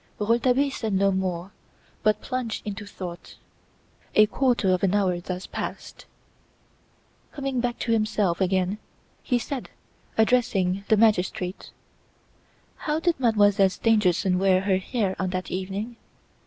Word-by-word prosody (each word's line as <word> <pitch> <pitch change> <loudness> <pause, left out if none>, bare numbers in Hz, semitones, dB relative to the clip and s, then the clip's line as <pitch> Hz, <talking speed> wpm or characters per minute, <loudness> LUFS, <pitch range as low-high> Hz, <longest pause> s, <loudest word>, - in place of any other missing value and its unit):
Rouletabille 245 +6 +2
said 220 -5 -3
no 195 +1 +3
more 185 -1 -2 0.5
but 215 -1 +2
plunged 250 -5 -4
into 205 0 -5
thought. 180 -3 -8 0.8
A 215 - +7
quarter 240 -4 +1
of 185 - 0
an 195 0 +2
hour 185 -4 +1
thus 180 +1 -5
passed. - - -7 1.2
Coming 275 -3 -3
back 240 0 -1
to 235 - -2
himself 215 -5 +1
again 190 +2 +1 0.4
he 250 - +1
said, 255 +3 -5 0.5
addressing 200 -5 +2
the 220 - +4
magistrate: 190 -4 +1 1.1
"How 305 0 -1
did 335 -3 0
Mademoiselle 205 -5 +4
Stangerson 190 -3 +2
wear 190 -1 +3
her 190 -1 +2
hair 190 0 -1
on 190 - -1
that 185 0 -4
evening?" 195 +5 -4
205 Hz, 130 wpm, -25 LUFS, 185-230 Hz, 1.2 s, A